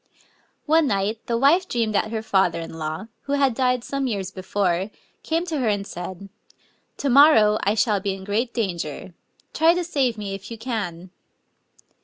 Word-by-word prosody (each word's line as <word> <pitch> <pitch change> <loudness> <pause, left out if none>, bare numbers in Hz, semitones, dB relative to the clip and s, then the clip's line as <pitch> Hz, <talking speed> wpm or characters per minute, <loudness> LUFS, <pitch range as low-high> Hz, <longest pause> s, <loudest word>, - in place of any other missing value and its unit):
One 315 0 +4
night 205 0 0
the 235 - 0
wife 320 +9 +4
dreamed 230 -3 0
that 210 +1 +1
her 220 -1 -3
fether 190 -5 +2
in 165 - -7
law, 155 +5 -4 0.2
who 280 - -2
had 275 -3 +3
died 250 0 +1
some 275 0 -2
years 195 -5 -3
before, 190 0 -1 0.3
came 330 +2 -1
to 320 -4 -2
her 250 - 0
and 205 -2 0
said, 185 +2 -7 0.4
" - - -40
To 280 - -2
morrow 240 -7 +6
I 205 +2 +1
shall 210 -2 +2
be 195 0 -2
in 190 - -10
great 220 +5 -1
danger: 180 - -4 0.4
try 325 +3 +4
to 355 - -1
save 270 -9 0
me 200 -2 -5
if 195 0 -8
you 230 - -7
can!" 195 -7 -4
215 Hz, 185 wpm, -23 LUFS, 195-265 Hz, 0.4 s, morrow